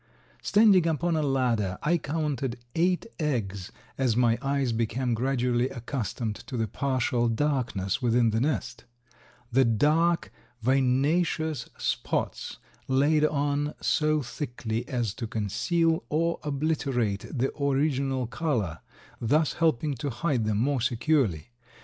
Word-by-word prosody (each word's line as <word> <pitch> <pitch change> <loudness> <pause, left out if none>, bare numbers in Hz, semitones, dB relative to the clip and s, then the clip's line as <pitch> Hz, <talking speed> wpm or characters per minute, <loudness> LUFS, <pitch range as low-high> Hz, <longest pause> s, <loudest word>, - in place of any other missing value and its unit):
Standing 205 -5 +5
upon 165 +1 0
a 155 - +1
ladder 120 -9 0
I 170 +3 +2
counted 145 -5 -2 0.2
eight 180 +2 +1
eggs 105 - -2 0.3
as 125 -4 +2
my 120 -2 +3
eyes 135 -2 0
became 115 +2 -1
gradually 125 0 +1
accustomed 120 -3 -4
to 125 - -4
the 110 -1 0
partial 125 -1 0
darkness 125 -5 -1
within 120 -1 +3
the 110 +1 0
nest; 140 -3 -2 0.7
the 135 +3 +5
dark, 150 +9 +2 0.3
vinaceous 140 +5 +1
spots - - -2 0.3
laid 145 +3 +3
on 145 0 0
so 155 -1 +1
thickly 120 -2 -4
as 120 -6 -1
to 115 - -5
conceal 120 - 0
or 165 +3 0
obliterate 140 -8 -1
the 135 -1 -1
original 135 -2 +1
color, 115 - -2 0.4
thus 145 +6 +2
helping 155 -3 +1
to 140 +4 -3
hide 130 -2 -1
them 105 -1 0
more 130 +3 +1
securely. 120 - +1
130 Hz, 120 wpm, -27 LUFS, 115-150 Hz, 0.7 s, Standing